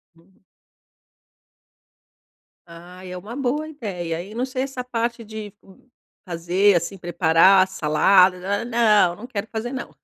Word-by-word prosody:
Uhum. 180 +3 -27 2.2
Ah, 175 +2 -13
é 180 0 -7
uma 210 +6 -9
boa 285 +3 -2
ideia, 180 - -5
hein? 205 +3 -12
Não 245 +2 -1
sei 260 0 -3
essa 265 -2 -5
parte 235 -1 -3
de 215 -2 -8
m 195 +6 -21 0.4
fazer, 180 +3 +2
assim, 175 +4 -4
"preparar 175 +2 +4
salada" 180 +3 +3
nã, 200 +4 -2
nã 225 -5 +3
não, 175 - -7
não 240 - -10
quero 215 -4 -5
fazer, 235 +3 -4
não! 255 - -5
200 Hz, 145 wpm, -22 LUFS, 180-235 Hz, 2.2 s, preparar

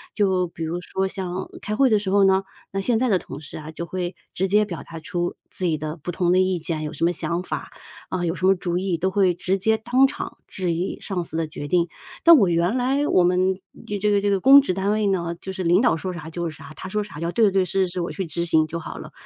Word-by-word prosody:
就 190 -3 +2
比 165 -1 -7
如 165 +2 -2
说 190 +2 -2
像 185 -1 -4
开 210 - -3
会 270 +3 +4
的 215 - +4
时 205 -2 -2
候 200 0 +5
呢， 190 0 +4 0.3
那 195 - -2
现 225 +2 +1
在 255 0 +1
的 195 - +4
同 140 -5 -8
事 145 - -8
啊， 155 0 -8
就 170 +2 -5
会 180 -1 -3 0.2
直 190 - 0
接 210 +3 +4
表 175 -5 -6
达 165 - -9
出 175 +2 -3
自 185 - -2
己 165 -3 +2
的 155 +1 -4
不 170 +3 -5
同 175 0 +1
的 185 - +4
意 185 -1 +2
见， 160 -1 -3
有 150 0 -4
什 - - -4
么 170 - +4
想 170 0 -2
法、 185 - -5 0.4
呃， 180 -1 -1
有 165 +1 -1
什 185 - -2
么 190 - +6
主 175 -1 -2
意， 185 -1 0
都 185 +4 0
会 190 -2 +3
直 185 +2 -1
接 220 +4 +2
当 245 +4 +3
场 270 - -4
质 185 -2 -2
疑 175 +3 -3
上 185 -4 -3
司 160 - -6
的 165 -1 0
决 150 -1 -7
定。 170 +2 +2 0.4
但 335 -1 +9
我 205 -7 +4
原 175 +7 +1
来 270 +4 +1
我 180 - +4
们， 185 +1 +2 0.5
这 210 - +2
个 200 -1 +3
这 205 - +1
个 200 -1 +2
公 275 +7 +8
职 265 -9 -1
单 195 +2 0
位 215 -1 +1
呢， 170 -3 0
就 190 - -5
是 190 -1 -4
领 175 +3 +4
导 240 -9 +3
说 185 +2 -4
啥 160 -2 -7
就 170 +1 -3
是 155 - -7
啥， - - -12
他 185 - -7
说 210 +2 -1
啥 205 -5 -12
就 150 - -7
要 170 - -1
“对 230 - +4
对 200 - +3
对， 190 -1 +2
是 190 +1 +1
是 175 - -7
是， 180 - -2
我 170 - -3
去 195 - -3
执 170 +2 -2
行”， 160 -2 +3
就 170 +2 -4
好 160 - -7
了。 - - -9
185 Hz, 310 characters per minute, -23 LUFS, 170-200 Hz, 0.5 s, 但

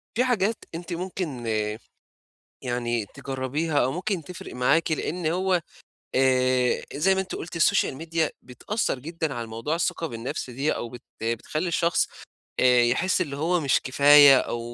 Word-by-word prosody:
في 245 - +3
حاجات 230 -4 +1 0.2
أنتِ 175 +1 -6
ممكن 170 -8 -4 1.1
يعني 120 -3 -2
تجرّبيها 140 +4 -3
أو 130 - 0
ممكن 180 +2 -2
تفرِق 180 +3 -9
معاكِ 145 +7 +2
لإن 165 +2 -2
هو 180 +2 +1 0.5
آآ 130 -1 +2
زي 190 +7 +3
ما 190 - +1
أنتِ 190 - -6
قُلتِ 175 +1 -7
السوشال 160 -4 +2
ميديا 165 +1 -1
بتأثّر 135 - -3
جدًا 160 +1 -4
على 120 -2 -5
موضوع 115 +8 -3
الثقة 165 0 -1
بالنفس 120 0 -5
دي 135 +5 -1
أو 120 - -5
بت 120 +1 -11 0.2
بتخلّي 115 +9 -2
الشخص 170 0 +1 0.5
آآ 125 -1 +5
يحِس 125 +11 +1
اللي 140 -3 -2
هو 170 +4 +1
مش 140 -4 +2
كفاية 140 +1 +7
أو 120 - -3
150 Hz, 150 wpm, -25 LUFS, 125-170 Hz, 1.1 s, كفاية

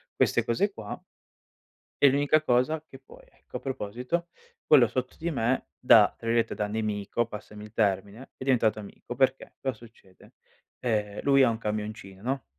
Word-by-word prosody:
queste - - +2
cose 195 - +1
qua 105 - -7 1.0
e 140 - +8
l'unica 145 +3 +3
cosa 150 +3 +1
che 135 - -13
poi 130 - -17
ecco, - - -10
a - - -9
proposito, 125 +7 -3 0.4
quello 130 -6 +6
sotto 130 +3 -3
di 170 +2 -2
me 125 -2 0
da 110 -4 +7
tra 115 - -8
virgolette 115 0 +1
da 105 - -1
"nemico"- 105 +1 -1
passami 105 -1 -9
il 105 0 -12
termine- 100 +3 -1
è - - -7
diventato 115 -5 +2
amico. 105 +3 -9
Perché 135 +1 0
cosa 135 -1 -1
succede: 110 -5 -18 0.5
ehm, 105 -4 -1
lui 135 -1 +5
ha 125 - +5
un 115 - -2
camioncino 105 -3 -5
no, 135 +2 -2
120 Hz, 165 wpm, -27 LUFS, 105-135 Hz, 1.0 s, e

